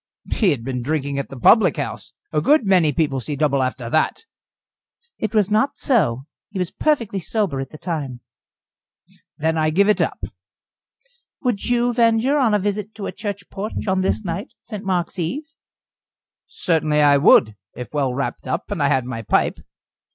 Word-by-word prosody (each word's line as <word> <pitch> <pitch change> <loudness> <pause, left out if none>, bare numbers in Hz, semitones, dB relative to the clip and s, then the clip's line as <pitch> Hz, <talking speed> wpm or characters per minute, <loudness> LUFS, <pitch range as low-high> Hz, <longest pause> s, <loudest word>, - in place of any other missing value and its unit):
"He 210 - +3
had 135 -8 -1
been 125 0 -3
drinking 140 +1 -2
at 140 - -5
the 135 - -9
public 185 - +5
house. - - -5 0.2
A 150 - +2
good 290 - +4
many 180 -6 +4
people 145 -2 0
see 145 +4 -4
double 140 -2 +1
after 130 -1 -2
that." 155 - 0 0.9
"It 220 0 -3
was 210 -1 +2
not 215 +6 +2
so. 140 - +1 0.2
He 205 - -7
was 180 -2 -2
perfectly 235 -10 0
sober 190 -7 -1
at 135 -1 -4
the 155 - -11
time." 145 -8 -4 1.2
"Then 160 +1 0
I 155 0 +2
give 195 +6 +3
it 210 - +3
up." - - -1 1.2
"Would 245 -6 -1
you 245 0 +1
venture 235 +4 +3
on 230 -6 +3
a - - +5
visit 205 +1 -3
to 205 - -6
a - - -3
church 200 -2 -6
porch 205 +3 -4
on 190 0 +1
this 190 +3 0
night 175 +8 -5
St. 210 -3 -8
Mark's 185 -1 -2
eve?" 205 - -2 1.0
"Certainly 155 -3 +1
I 145 -1 +6
would, 110 -6 +5 0.2
if 125 - -8
well 140 -3 0
wrapped 135 +1 -4
up, 130 - -3
and 195 -6 -2
I 140 - +3
had 130 -3 +1
my 125 -2 -5
pipe." 110 - +1
170 Hz, 180 wpm, -21 LUFS, 140-210 Hz, 1.2 s, I